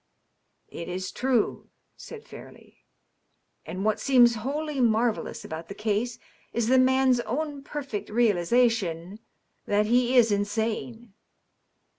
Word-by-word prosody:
'* - - -45
^^ - - -14
It 170 - -6
is 185 +1 -4
true," 250 -3 -1 0.3
said 455 -2 -11
Fairleigh. - - -12
^^ - - -22 0.9
And 190 +2 -4
what 215 -1 +1
seems 245 -3 +5
wholly 285 +6 -3
marvellous 230 -1 0
about 160 +1 -7
the 200 - -8
case 215 +3 -1 0.4
is 235 -1 0
the 260 0 +5
man's 260 -1 +3
own 285 +4 -3
perfect 275 -7 -6
realization 210 -3 +1 0.5
that 205 +1 +2
he 245 +3 +2
is 230 -3 +5
insane. 220 +2 -2
230 Hz, 130 wpm, -26 LUFS, 205-255 Hz, 0.9 s, seems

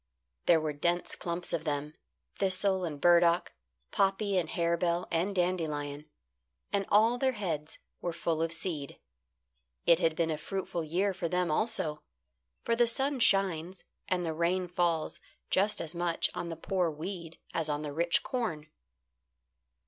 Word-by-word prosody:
There 170 -2 +6
were 155 -1 -2
dense 170 +4 0
clumps 175 0 -2
of 165 -2 -1
them 150 -1 -2 0.5
thistle 190 -1 +2
and 150 -4 -5
burdock, 170 +1 +4 0.4
poppy 195 +1 +1
and 180 -3 +1
harebell, 170 +1 0
and 180 +4 0
dandelion; 155 -5 -1 0.6
and 200 -1 +1
all 225 +4 +4
their 260 0 +2
heads 165 -8 -3 0.2
were 175 - -1
full 165 -1 -1
of 165 0 0
seed. 160 -4 -2 0.9
It 170 -1 +6
had 165 -3 +2
been 165 0 +1
a 155 - -2
fruitful 185 -2 -3
year 185 +6 0
for 175 -2 -3
them 180 -2 +1
also, 155 -5 0 0.6
for 230 - +1
the 240 0 +4
sun 270 +4 0
shines 190 -4 +2 0.2
and 180 -1 0
the 160 - -1
rain 175 +3 +1
falls 170 -2 0 0.3
just 205 +3 +2
as 165 0 -3
much 170 -1 +1
on 170 - -4
the 165 - -4
poor 180 +1 0
weed 165 +1 -6 0.2
as 160 -2 0
on 150 0 -1
the 145 -1 -4
rich 170 +3 +2
corn. 165 - -3
170 Hz, 155 wpm, -31 LUFS, 160-190 Hz, 0.9 s, There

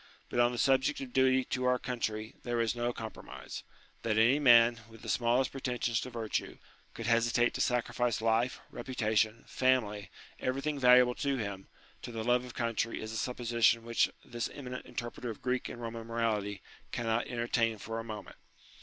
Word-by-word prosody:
But - - -1
on 120 0 +5
the 120 - -5
subject 135 +2 +3
of 130 -3 -7
duty 130 0 +4
to 125 0 -2
our 125 0 +3
country 110 -3 -3
there 120 -1 -2
is 115 -2 +1
no 120 0 0
com 110 -2 -6
promise. - - -9 0.4
That 110 -2 0
any 120 +6 +5
man, 120 -3 +6
with 115 -1 -15
the - - -6
smallest 120 +2 +2
pretensions 125 -3 -1
to 130 - -5
virtue, 115 -3 -3 0.4
could 115 - -5
hesitate 120 +1 +3
to - - -2
sacrifice 120 -1 +1
life, 115 +2 +1
reputation, 115 -3 0
family, 105 -6 +1 0.3
everything 140 +3 -1
valuable 125 -1 +6
to 140 -1 +1
him, 100 -4 -5 0.3
to - - -7
the 115 -1 -4
love 125 +1 +3
of 125 - -10
country 115 -1 -1
is 110 - -5
a - - -6
supposition 120 -1 +2
which 115 0 +2 0.2
this 120 0 -3
eminent 125 -3 -7
inter 120 -2 -4
preter 125 - -6
of 110 - -8
Greek 125 0 -1
and - - -8
Eoman 115 -1 -6
morality 105 -4 -1 0.3
cannot 115 0 0
entertain 120 -2 0
for 115 +2 -5
a - - -4
moment. 110 -2 -8
120 Hz, 180 wpm, -31 LUFS, 115-125 Hz, 0.4 s, man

